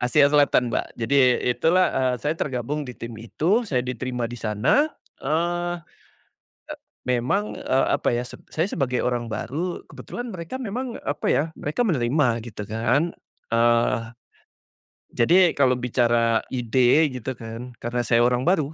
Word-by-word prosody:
Asia 140 +4 +4
Selatan 135 -5 +3
Mbak. - - -3
Jadi, 125 +2 +3
itulah 165 +9 +3
eee, 130 -1 +1
saya 150 +4 -1
tergabung 140 -1 -3
di 125 - -8
tim 115 0 -7
itu, 190 - 0
saya 125 -3 0
diterima 125 0 -3
di 120 +1 -5
sana, 110 - +2 0.3
eee, 175 +4 -1 1.3
memang, 125 - -1
eee, 130 - +1
apa 120 - +1
ya, 120 - -1
saya 160 +7 -4
sebagai 125 -2 -1
orang 120 -1 -1
baru, 155 - -4
kebetulan 245 -1 -7
mereka 170 +5 -6
memang 250 0 -4
apa 145 - -2
ya, 145 - +3 0.2
mereka 155 +12 -1
menerima 130 - +1
gitu 110 -2 -7
kan, 120 - 0 0.4
eee, 115 0 +3 1.1
jadi 175 +8 +4
kalau 130 -3 +3
bicara 120 -2 +2
ide 125 +4 +3 0.2
gitu 130 +2 -5
kan, 115 +2 -7
karena 120 +1 -2
saya 120 0 +3
orang 125 0 +2
baru, 155 -5 +1
125 Hz, 140 wpm, -24 LUFS, 120-160 Hz, 1.3 s, Asia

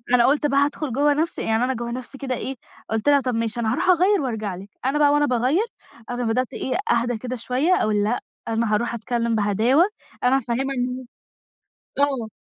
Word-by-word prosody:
أنا 235 - +5
قُلت 295 +2 +3
بقى 280 0 +2
هادخل 290 -3 -4
جوّه 290 +2 +3
نفْسي 320 +3 -1
يعني 225 +2 +1
أنا 260 +1 +1
جوّه 235 0 -4
نفْسي 255 +2 -7
كده 260 -2 -2
إيه، 265 +3 -3 0.3
قُلت 225 +6 +1
لها: 285 -1 +6
"طيب 250 -2 -2
ماشي 230 +1 -1
أنا 220 -1 0
هاروح 365 - 0
أغيّر 370 +1 +4
وأرجع 220 -7 -3
لِك" 195 +3 -11 0.2
أنا 285 +3 +1
بقى 290 -1 +5
وأنا 295 0 +3
باغيّر، 260 - +1 0.4
أنا 245 0 -2
بدأت 240 +2 -1
إيه 260 - -2 0.2
أهدا 235 0 +1
كده 255 +2 -5
شوية، 255 +9 +1
أقول 210 -1 +1
لأ 225 +4 0 0.3
أنا 225 -1 0
هاروح 235 +3 0
أتكلّم 235 0 -1
بهداوة، 220 - +3 0.4
أنا 255 +2 +4
هافهّمها 265 +2 -2
إن 250 +1 -3 0.9
ه - - +7
آه. 250 -6 -1
250 Hz, 200 wpm, -23 LUFS, 230-275 Hz, 0.9 s, ه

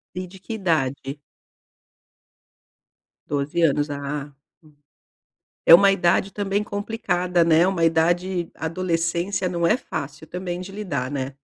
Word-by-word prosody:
E 185 0 -4
de 190 +2 -14
que 225 - -6
idade? 145 -7 -1 2.1
12 145 +4 -1
anos, 145 -1 +2
ah. 145 0 -4 1.3
É - - +9
uma 200 +2 +5
idade 195 +1 +2
também 205 0 -1
complicada, 205 -5 0
né? 165 +2 +4
Uma 185 -3 0
idade 175 +2 +1
adolescência 170 +2 -1
não 170 -1 -1
é 220 - +4
fácil 150 - -7
também 180 +1 -5
de 185 +1 -8
lidar, 155 -11 -3
né? 135 -1 -3
170 Hz, 120 wpm, -23 LUFS, 150-190 Hz, 2.1 s, É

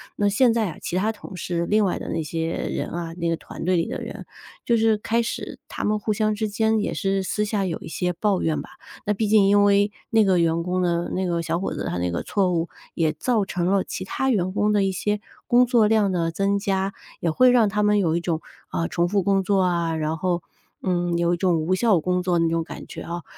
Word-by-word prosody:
那 205 - +1
现 235 +4 +4
在 225 -2 +1
啊， - - -11
其 - - -4
他 210 +4 +1
同 205 -3 -11
事 170 0 -2
另 215 0 +3
外 185 - -1
的 - - -6
那 165 - -2
些 165 +2 -3
人 - - -3
啊 170 -1 -5
那 170 0 -2
个 165 - 0
团 - - -9
队 185 +2 +2
里 165 - 0
的 - - -4
人， - - -7 0.4
就 235 - +3
是 220 -1 +3
开 230 +2 0
始 235 - -5
他 - - -5
们 210 0 +1
互 215 - -2
相 215 0 +1
之 215 0 -2
间， 220 +1 +1
也 210 - -1
是 195 -1 0
私 210 +3 -1
下 205 -2 -1
有 170 -3 -2
一 - - -9
些 180 +2 -1
抱 195 +1 0
怨 160 -1 0
吧。 - - -12 0.3
那 210 - +2
毕 215 +1 -1
竟 210 -1 +5
因 205 +1 +5
为 205 0 +4 0.2
那 225 -1 +4
个 185 -2 +3
员 165 0 +1
工 180 +1 -1
呢 170 -1 0
那 190 - -1
个 170 -1 0
小 170 - -1
伙 195 - -3
子 - - -4
他 90 - -2
那 90 - 0
个 85 - -3
错 190 -3 +1
误， 170 -1 -1 0.3
也 160 -2 +1
造 215 +6 0
成 175 -2 -2
了 195 0 +2
其 - - -5
他 265 +7 -1
员 185 -4 +1
工 210 +1 +2
的 205 -1 +3
一 195 - +1
些 210 +2 -1 0.3
工 245 +1 +5
作 235 -4 +4
量 210 -3 +3
的 165 -2 0
增 195 +3 +1
加， 195 -1 -1 0.3
也 170 - 0
会 250 +10 +5
让 235 -4 +4
他 210 +1 0
们 210 0 +3
有 165 -4 +1
一 - - +1
种， 170 -2 -2 0.3
呃， 165 - -1
重 170 0 0
复 200 +2 +1
工 195 0 +2
作 195 0 +2
啊， 170 -2 +1
然 155 0 -1
后， 175 +1 -1 0.4
嗯， 175 -2 0
有 170 0 +2
一 - - -8
种 175 -3 +2
无 180 +4 +1
效 205 -3 +3
工 180 +2 0
作 180 -1 +1
的 165 - +3
那 165 - +2
种 165 0 0
感 - - -9
觉 - - -8
哦。 170 0 -5
190 Hz, 280 characters per minute, -23 LUFS, 170-210 Hz, 0.4 s, 竟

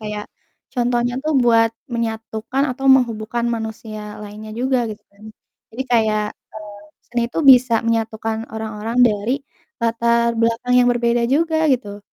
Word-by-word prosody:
kayak 210 -1 -5 0.5
contohnya 245 -1 0
tuh 310 - 0
buat 230 -1 +4 0.2
menyatukan 225 +2 -3
atau 270 +2 -8
menghubungkan 235 -1 0
manusia 220 -1 -6 0.2
lainnya 210 +1 -9
juga, 260 0 +1
gitu, 210 - -9
kan. 200 +1 -18 0.5
Jadi, 250 +4 -3
kayak, 215 -2 +2 0.6
eee, 205 0 -18 0.2
seni 240 -1 -1
itu - - -2
bisa 250 -1 +5
menyatukan 225 -1 -1 0.2
orang-orang 220 +1 -4
dari 210 +2 -1 0.5
latar 235 0 +2
belakang 230 +2 +1
yang 245 - +4
berbeda 240 0 +1
juga, 320 +1 +1 0.2
gitu. 205 -5 -5
230 Hz, 135 wpm, -20 LUFS, 220-240 Hz, 0.6 s, bisa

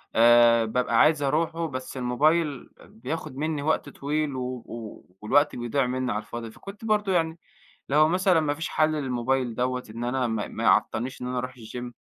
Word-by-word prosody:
آآ 115 0 +6
بابقى 115 0 +1
عايز 155 -1 +4
أروحُه 165 +4 0
بس 130 -2 -6
الموبايل 145 +4 +1 0.2
بياخد 130 +4 -6
مني 155 0 -2
وقت 150 0 0
طويل 145 0 -2
و 130 - -3 0.2
و 115 -2 -9 0.2
والوقت 145 +8 +3
بيضيع 120 +3 0
مني 130 0 -2
على 105 - -2
الفاضي، 115 +1 -7
فكنت 200 - -11
برضه 210 -2 +1
يعني 165 -1 0 0.5
لو 150 +2 +4
مثلًا 180 0 +3
ما 150 -2 0
فيش 160 +2 -4
حَلّ 155 0 +2
للموبايل 130 -3 -1
دوَّة 125 +1 -1
إن 115 +2 -5
أنا 125 +1 0
ما 110 -3 -2
ما - - -5
يعطلنيش 125 +4 +1
إن - - -3
أنا 125 0 -2
أرُوح 125 +1 -4
الgym؟ 120 +1 -7
130 Hz, 180 wpm, -26 LUFS, 120-155 Hz, 0.5 s, آآ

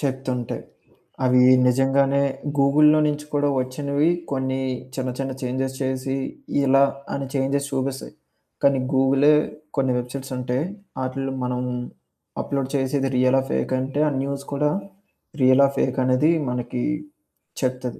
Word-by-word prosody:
చెప్తుంటయి. 130 -3 -3 0.6
అవి 125 0 +5 0.2
నిజంగానే 135 +2 +3 0.4
గూగుల్లో 150 +2 +5
నుంచి 150 0 -2
కూడా 145 0 +2
ఒచ్చినవి 140 +4 0 0.2
కొన్ని 130 -1 -1 0.3
చిన్న 130 -1 -2
చిన్న 135 -1 -2
చేంజెస్ 130 +1 -2
చేసి 130 0 -2 0.5
ఇలా 135 +1 +5 0.3
అని 140 -1 -3
చేంజెస్ 140 +1 0
చూపిస్తాయి. 135 0 -3 0.5
కానీ 140 -1 +4
గూగులే 135 +3 +4 0.4
కొన్ని 130 -2 +2
వెబ్సైట్స్ 130 +2 -6
ఉంటాయి 125 +3 -1 0.4
అటిల్లో 135 +1 -3
మనం 125 0 -2 0.8
అప్‌లోడ్ 135 -2 -2
చేసిది 135 0 0
రియలా? 130 +1 +4
ఫేకంటే, 130 +1 -1
ఆ - - 0
న్యూస్ 140 0 -4
కూడా 150 +1 +1 0.7
రియలా 130 +2 +6
ఫేక - - 0
అనేది 130 +5 +3 0.2
మనకి 125 0 -3 0.8
చెప్తది. 125 -2 -2
135 Hz, 115 wpm, -23 LUFS, 130-140 Hz, 0.8 s, రియలా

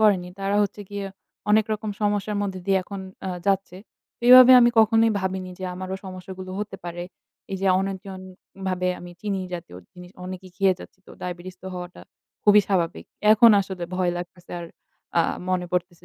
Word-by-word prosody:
করেনি 195 -5 +3
তারা 195 +1 0
হচ্ছে 205 +1 -3
গিয়ে 200 -1 -4 0.4
অনেক 215 +1 +5
রকম 215 0 -3
সমস্যার 205 0 0
মধ্য 200 -2 -2
দিয়ে 195 -1 +3
এখন 195 +2 -7 0.3
আ - - -1 0.2
যাচ্ছে। 195 -2 0 0.5
এইভাবে 255 +1 +10
আমি 240 0 +6
কখনোই 225 +1 +5
ভাবিনি 190 -1 -3
যে 185 - -5
আমারও 185 +1 -5
সমস্যাগুলো 185 0 -8
হতে 210 -1 -4
পারে। 175 0 -5 0.5
এই - - -1
যে 195 - 0
অনিয়ন্ত্রণ 195 0 -4 0.5
ভাবে 180 0 0
আমি 175 - -10
চিনি 200 -2 -2
জাতীয় 170 - -8 0.2
জিনিস 180 0 -12
অনেকই 185 0 -8
খেয়ে 195 -2 +3
যাচ্ছি - - -13
তো - - -14
diabetes 180 +1 -6
তো - - -8
হওয়াটা 180 0 -8 0.4
খুবই 210 0 +7
স্বাভাবিক। 170 - 0 0.3
এখন 230 +2 +7
আসলে 190 -2 -5
ভয় 180 -1 +1
লাগতেছে 175 0 -10
আর - - -6 0.5
আ - - +7 0.3
মনে 180 -1 0
পড়তেছে 175 -1 -2
190 Hz, 170 wpm, -24 LUFS, 180-205 Hz, 0.5 s, এইভাবে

